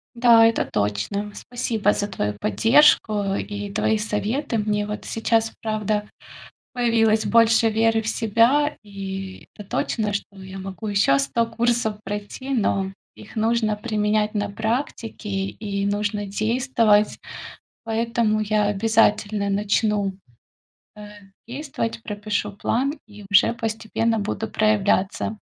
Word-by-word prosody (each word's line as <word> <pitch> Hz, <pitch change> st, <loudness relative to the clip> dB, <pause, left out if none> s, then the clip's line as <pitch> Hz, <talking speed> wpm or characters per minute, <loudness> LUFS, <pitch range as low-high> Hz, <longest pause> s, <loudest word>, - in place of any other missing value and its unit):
Да, 235 Hz, -1 st, +6 dB
это 230 Hz, 0 st, +2 dB
точно. 105 Hz, -, -2 dB
Спасибо 225 Hz, -4 st, -1 dB
за 205 Hz, -, -2 dB
твою 105 Hz, -, -2 dB
поддержку 210 Hz, -, +3 dB
и 205 Hz, 0 st, -5 dB
твои 220 Hz, +2 st, +1 dB
советы. 225 Hz, +5 st, -2 dB
Мне 210 Hz, -1 st, 0 dB
вот 210 Hz, 0 st, -6 dB
сейчас, 225 Hz, 0 st, 0 dB
правда, 215 Hz, -1 st, -2 dB, 0.6 s
появилось 225 Hz, -3 st, +2 dB
больше 230 Hz, 0 st, +4 dB
веры 225 Hz, +1 st, +2 dB
в -, -, -6 dB
себя. 230 Hz, +7 st, +2 dB
И 195 Hz, -2 st, -7 dB
это 205 Hz, -, -11 dB
точно, 210 Hz, 0 st, -1 dB
что 200 Hz, -1 st, -5 dB
я 190 Hz, 0 st, -8 dB
могу 190 Hz, +2 st, -7 dB
ещё 200 Hz, -9 st, +3 dB
100 140 Hz, +12 st, 0 dB
курсов 230 Hz, -1 st, 0 dB
пройти, 205 Hz, +6 st, -6 dB
но 200 Hz, -6 st, 0 dB, 0.2 s
их 210 Hz, -, -14 dB
нужно 220 Hz, -1 st, +1 dB
применять 210 Hz, -1 st, 0 dB
на 205 Hz, -1 st, -1 dB
практике 225 Hz, 0 st, -3 dB
и 200 Hz, +1 st, -3 dB
нужно 205 Hz, 0 st, -1 dB
действовать. 220 Hz, 0 st, +2 dB, 0.7 s
Поэтому 225 Hz, -1 st, 0 dB
я 215 Hz, 0 st, +1 dB
обязательно 210 Hz, 0 st, +2 dB
начну, 205 Hz, 0 st, +1 dB, 0.8 s
э, -, -, -11 dB, 0.5 s
действовать, 260 Hz, -4 st, -4 dB
пропишу 205 Hz, -1 st, -3 dB
план 260 Hz, +7 st, -1 dB
и 205 Hz, -1 st, -13 dB
уже 200 Hz, +3 st, +4 dB
постепенно 225 Hz, 0 st, -1 dB
буду 215 Hz, +2 st, -3 dB
проявляться. 215 Hz, 0 st, +1 dB
215 Hz, 120 wpm, -23 LUFS, 205-225 Hz, 0.8 s, Да